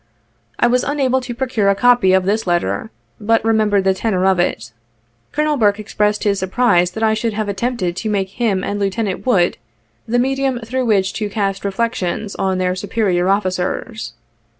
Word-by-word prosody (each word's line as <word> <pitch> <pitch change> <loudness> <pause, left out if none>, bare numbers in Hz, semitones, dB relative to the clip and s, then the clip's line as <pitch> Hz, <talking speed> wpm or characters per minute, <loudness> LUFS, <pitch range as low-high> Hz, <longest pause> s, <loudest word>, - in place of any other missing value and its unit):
I - - +3
was 245 +1 +2
unable 265 -3 +1
to 250 -1 -6
procure 240 -6 0
a 200 - +3
copy 245 -3 +4
of 190 0 +3
this 210 +1 0
letter, 135 - -1 0.3
but 225 +1 +1
remember 215 -3 +2
the 190 0 +3
tenor 190 -2 -1
of 190 -2 +3
it. 115 -9 -1 0.6
Colonel 300 0 0
Burke 210 -3 +2
expressed 210 0 -1
his 200 -2 +1
surprise 185 -2 +2
that 220 - -3
I 220 0 +3
should 220 0 -1
have 215 0 -2
attempted 200 -3 -2
to 215 +3 -3
make 195 -2 -1
him 200 -3 -1
and 205 +1 -2
Lieutenant 200 +2 -2
Wood 180 -8 +2 0.5
the 240 +2 +1
medium 265 0 0
through 255 +3 -2
which 200 -3 +2
to 210 -1 -3
cast 195 -1 -2
reflections 200 -1 -2
on 190 -1 0
their 180 0 0
superior 190 -2 0
officers. 190 - -2
210 Hz, 175 wpm, -18 LUFS, 190-235 Hz, 0.6 s, copy